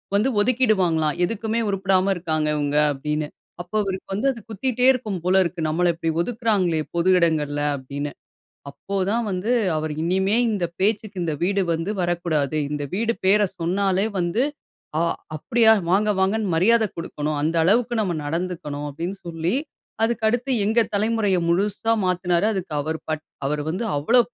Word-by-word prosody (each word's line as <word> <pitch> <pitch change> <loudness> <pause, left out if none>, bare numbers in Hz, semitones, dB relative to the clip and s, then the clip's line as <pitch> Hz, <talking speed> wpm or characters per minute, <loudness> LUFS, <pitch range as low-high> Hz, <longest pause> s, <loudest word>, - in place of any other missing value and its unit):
வந்து 215 +6 +3
ஒதுக்கிடுவாங்களாம். 190 - +2
எதுக்குமே 225 +3 -2
உருப்படாம 195 0 +2
இருக்காங்க 155 -3 -1
இவங்க 145 0 0 0.2
அப்டின்னு. 150 +2 -2 0.3
அப்போ 175 +4 -9
அவருக்கு 190 -1 -4
வந்து 215 +8 0
அது 240 - -8
குத்திக்கிட்டே 250 +3 +1
இருக்கும் 215 -7 -4
போல 185 +2 +4
இருக்கு. 175 0 -4
நம்மள 175 +3 +2
இப்டி 165 0 -2
ஒதுக்குறாங்களே 205 -6 0 0.2
பொது 170 +2 +2
இடங்கள்ல 150 -4 +1
அப்டின்னு. 140 +2 -5 0.6
அப்போ 140 +8 -7 0.2
தான் 235 +2 +1
வந்து 185 +5 -1 0.3
அவர் 155 0 -2
இனிமே 190 +4 +1 0.2
இந்த, 200 -5 0
பேச்சுக்கு 210 +1 0
இந்த 160 -2 -1
வீடு 200 +2 +2
வந்து 165 +5 -2
வரக்கூடாது. 170 -5 0
இந்த 150 -1 -2
வீடு 230 +4 +1
பேர 210 +2 +5 0.2
சொன்னாலே 190 +3 +1
வந்து 175 +8 +1 0.5
ஆ - - +2 0.3
அப்டியா 225 +8 +3 0.2
வாங்க, 205 +4 +3
வாங்கன்னு 200 +1 +1
மரியாத 220 +7 +4
குடுக்கணும். 150 -2 -3
அந்த 160 +3 0
அளவுக்கு 230 +7 +2
நம்ம 190 -5 0
நடந்துக்கணும். 165 -2 -3
அப்டின்னு 170 +7 -5
சொல்லி, 165 +2 -2 0.5
அதுக்கடுத்து 235 +3 +1
எங்க 220 +3 +3 0.2
தலைமுறைய 210 -2 +1
முழுசா 200 +5 +1
மாத்தினாரா 180 +2 +1
அதுக்கு 190 -5 -4
அவர் 160 +2 -3
பட் 155 -1 -2 0.2
அவரு 150 +1 -1
வந்து 185 +8 -2
அவ்ளோ 155 +13 +3
185 Hz, 150 wpm, -23 LUFS, 160-215 Hz, 0.6 s, பேர